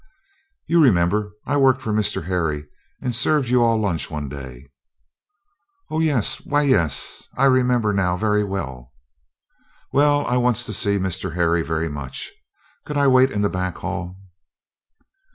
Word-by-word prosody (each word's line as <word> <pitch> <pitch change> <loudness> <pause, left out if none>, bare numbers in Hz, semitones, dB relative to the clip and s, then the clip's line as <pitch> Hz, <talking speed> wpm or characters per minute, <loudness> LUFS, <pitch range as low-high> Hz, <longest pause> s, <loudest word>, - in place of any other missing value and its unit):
"You 170 0 +3
remember 105 -2 +2
I 145 - 0
worked 130 -2 +4
for 110 -5 -3
Mr. 105 -6 0
Harry 80 -5 -1 0.4
and 125 -2 -1
served 135 +2 +1
you 125 0 +3
all 115 -1 +3
lunch 100 -7 -2
one 75 -3 -5
day." 65 -1 -10 1.2
"Oh, 155 - -1
yes 145 -9 +1
why, 145 0 +1
yes! 85 - 0
I 135 - +3
remember 125 -5 +3
now 90 -2 +1
very 105 +1 +1
well." 65 -11 -6 1.0
"Well, 145 +1 +3
I 125 - 0
wants 120 -1 +1
to - - -3
see 100 -2 0
Mr. 95 -2 -3
Harry 85 -1 +2
very 80 0 -2
much; 70 -4 -6 0.5
could 150 - -4
I 140 - +3
wait 130 0 +5
in 105 0 -1
the - - +3
back 90 -2 -3
hall?" 90 +2 -5
105 Hz, 150 wpm, -21 LUFS, 85-125 Hz, 1.2 s, wait